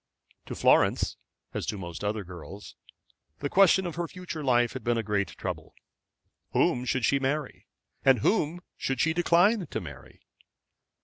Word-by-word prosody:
To - - -5
Florence, - - +3 0.4
as - - -3
to 105 - -2
most 85 -2 -7
other 105 0 -1
girls, 90 +2 -10 0.6
the 140 - -4
question 190 0 +5
of 170 -2 -5
her 170 -1 -1
future 180 -3 -7
life 120 -3 +3
had 130 - -6
been 120 -1 +1
a 115 - -1
great 100 -2 -2
trouble. - - -6 0.8
Whom 125 0 +2
should 130 -1 0
she 140 - +3
marry? 135 +1 -3 0.4
and 135 -2 +6
whom 175 - +1 0.2
should 135 -2 -2
she 160 +3 +2
decline 175 +3 +3
to - - -3
marry? 75 -6 -11
135 Hz, 160 wpm, -28 LUFS, 105-170 Hz, 0.8 s, and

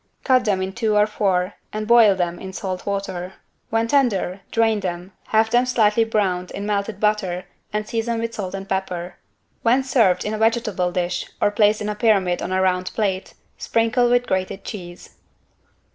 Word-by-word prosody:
Cut 255 -2 +3
them 195 -3 +1
in 190 0 -4
two 215 +1 0
or 210 0 +5
four 195 -3 0 0.2
and 215 0 -4
boil 230 -4 +6
them 175 -1 -2
in 190 0 -8
salt 185 -1 -5
water. 190 -2 -3 0.4
When 225 +1 +1
tender, 210 -8 +1
drain 225 -2 +2
them, 180 -1 -5 0.2
have 220 0 +2
them 245 +1 +3
slightly 225 -2 +3
browned 190 -5 0
in 200 - -6
melted 205 0 -2
butter 195 -4 0 0.3
and 210 0 -2
season 230 0 -1
with 230 0 -3
salt 195 -3 -4
and 195 0 -7
pepper. 180 -2 -3 0.4
When 250 +3 +3
served 220 -9 +2
in 210 - -2
a 215 - -3
vegetable 220 -5 +1
dish 175 -1 -2
or 205 - +2
placed 210 0 +3
in 210 - -3
a - - -1
pyramid 200 -5 +2
on - - -4
a 190 0 +1
round 185 0 0
plate, 195 -3 -2 0.2
sprinkle 235 +2 +2
with 245 0 +3
grated 190 0 -2
cheese. 175 -4 -9
205 Hz, 180 wpm, -22 LUFS, 185-225 Hz, 0.4 s, boil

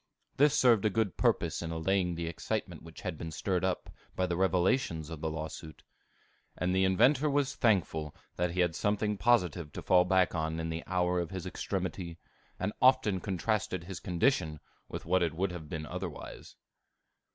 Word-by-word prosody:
This 145 +1 +5
served 120 -7 +5
a 110 - +3
good 105 -3 0
purpose - - +1
in 85 - -4
allaying 90 +2 0
the 85 0 -3
excitement 85 0 -3
which 80 0 -12
had 90 -5 -4
been 80 - -5
stirred 90 +3 -1
up 95 -1 -1 0.2
by 95 - +1
the 90 -1 -1
revelations 90 - +1
of 80 -2 -7
the 80 - -1
lawsuit. 80 -1 -7 0.7
And 90 +1 0
the 95 0 +3
inventor 130 +10 +4
was 140 -1 +1
thankful 85 - +1 0.2
that 90 0 0
he 90 +2 0
had 90 -2 +2
something 105 +3 0
positive 90 -9 +2
to - - -5
fall 90 -1 +5
back 95 0 +3
upon 80 -1 -2
in 80 0 -3
the 80 +1 -4
hour 90 -1 +1
of 85 - -2
his 95 -2 -5
extremity, 90 -2 -4 0.4
and 95 +3 -1
often 130 -7 +4
contrasted 95 -1 -1
his 90 0 -7
condition 90 - +1 0.3
with - - -6
what 90 +2 +2
it 80 -2 0
would 95 +2 0
have 80 -4 -8
been 75 -1 -4
otherwise. 90 0 -7
90 Hz, 180 wpm, -31 LUFS, 80-100 Hz, 0.7 s, This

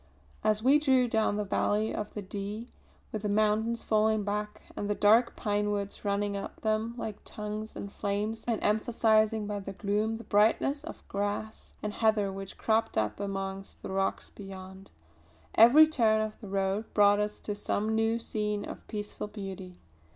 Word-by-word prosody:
As 215 0 +2
we 275 +4 +6
drew 260 -4 +3
down 220 -2 +1
the 210 - 0
valley 210 +2 0
of 210 - -4
the 210 - -4
Dee, 205 +4 -6 0.4
with 215 - -3
the 210 - -2
mountains 215 +2 +1
falling 215 0 +2
back 210 +1 -3
and 205 - -3
the 205 - +1
dark 225 +4 +4
pinewoods 205 -1 -1
running 200 0 0
up 200 0 -6
them 220 +1 0
like 220 -3 -5
tongues 215 +1 -6
of 200 - -7
flame 205 +2 -1
and 230 -3 +1
emphasising 220 0 +2
by 205 0 -3
their 195 0 -7
gloom 210 +3 0
the 230 - -9
brightness 230 +8 +2
of 325 - -10
grass 205 +2 -3
and 210 -1 -2
heather 215 -3 +2
which 195 0 -7
cropped 225 0 +1
up 105 - 0
amongst 195 -1 -5
the - - -5
rocks 195 0 -1
beyond, 190 -1 -10 0.6
every 245 +8 +8
turn 230 -8 +2
of 215 0 -3
the 205 - -8
road 195 +2 -1
brought 205 0 +6
us 210 0 -1
to 210 - -3
some 210 +1 -1
new 225 +1 +2
scene 210 -2 -2
of - - -9
peaceful 210 0 -5
beauty. 195 -3 -8
210 Hz, 170 wpm, -30 LUFS, 200-220 Hz, 0.6 s, every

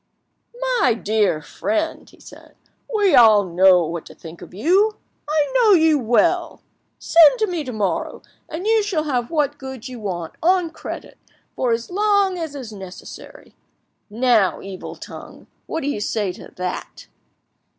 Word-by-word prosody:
"My 250 - +3
dear 210 -8 0
friend," 220 - -3
he - - -21
said, - - -15 0.4
"we 410 -6 +2
all 220 -5 +7
know 180 0 +4
what 165 +1 -5
to - - -13
think 165 0 -12
of - - -11
you. 375 - +2 0.3
I 305 +3 +1
know 470 -4 +5
you 320 -4 +4
well. 240 -1 +1 0.3
Send 330 +5 +5
to 440 - +1
me 350 -6 -3
tomorrow, 215 -7 -3 0.3
and 325 +5 -6
you 445 0 +3
shall 380 -7 -1
have 250 -6 -2
what 295 -3 -1
goods 265 -2 -8
you 250 -2 -8
want, 175 -6 -5
on 355 -1 +2
credit, - - -9 0.4
for 250 -2 0
as 230 +7 -2
long 405 -1 +2
as 320 -3 -5
is 245 -6 -8
necessary. 190 -2 -11 0.6
Now, 225 -3 +2
evil 195 -2 -8
tongue, - - -11 0.2
what 325 - -3
do 275 - -4
you 250 -8 -2
say 205 -2 -1
to - - -12
that?" 180 0 -6
255 Hz, 155 wpm, -21 LUFS, 205-335 Hz, 0.6 s, all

